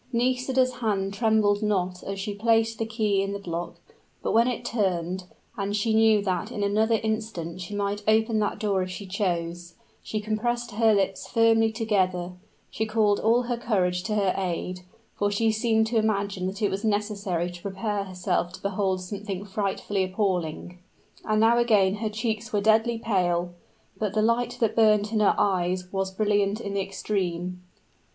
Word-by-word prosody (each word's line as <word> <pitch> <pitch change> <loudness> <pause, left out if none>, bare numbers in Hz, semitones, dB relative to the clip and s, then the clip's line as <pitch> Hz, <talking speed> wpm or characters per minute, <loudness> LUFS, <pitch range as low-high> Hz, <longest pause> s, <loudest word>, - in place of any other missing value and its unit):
Nisida's 255 +1 +1
hand 200 -5 -1
trembled 215 -1 +2
not 185 -4 0
as 195 0 -5
she 205 +1 -3
placed 225 +1 +1
the 225 - -1
key 215 -3 +1
in 195 0 -2
the 200 -2 -7
lock; 170 +1 -4 0.5
but - - 0
when 230 +2 +4
it 250 -3 -3
turned, 185 -4 -1 0.3
and 200 -2 -2
she 220 +2 +1
knew 220 -2 +4
that 185 -2 -2
in 205 - -3
another 220 +2 +2
instant 215 -6 -3
she 180 +3 -6
might 205 0 -2
open 220 0 +3
that 210 - -1
door 200 -3 0
if 185 - -3
she 190 +2 -7
chose, 175 -3 -3 0.3
she 215 - -3
compressed 235 +3 -2
her 220 +1 +3
lips 195 -1 -1
firmly 225 -1 +3
together 190 -6 0 0.4
she 220 - -2
called 215 -2 +2
all 235 +3 +3
her 240 0 -2
courage 185 -6 0
to 210 +3 -2
her 195 -3 +2
aid 180 -1 -3 0.3
for 205 - 0
she 220 +2 +2
seemed 220 0 +2
to 225 +1 -1
imagine 200 -3 -1
that 195 +3 -5
it 205 - +2
was 195 +3 -3
necessary 205 -5 -1
to 175 0 -11
prepare 200 +1 -3
herself 180 -1 -1
to - - -10
behold 195 -1 0
something 200 0 -5
frightfully 200 0 -1
appalling. 180 -3 -2 0.5
And 215 -1 +1
now 230 +2 +5
again 210 -4 +3
her 215 0 -2
cheeks 220 0 -3
were 210 - +1
deadly 220 +3 +3
pale; 180 -6 0 0.5
but 210 -2 -2
the 215 - +3
light 230 +2 +1
that 225 - +2
burned 215 -2 +4
in 220 - +1
her 210 - +4
eyes 180 -1 0
was 195 0 0
brilliant 205 +1 +1
in 200 -3 -5
the 200 - 0
extreme. 180 -2 -3
205 Hz, 175 wpm, -26 LUFS, 190-220 Hz, 0.5 s, now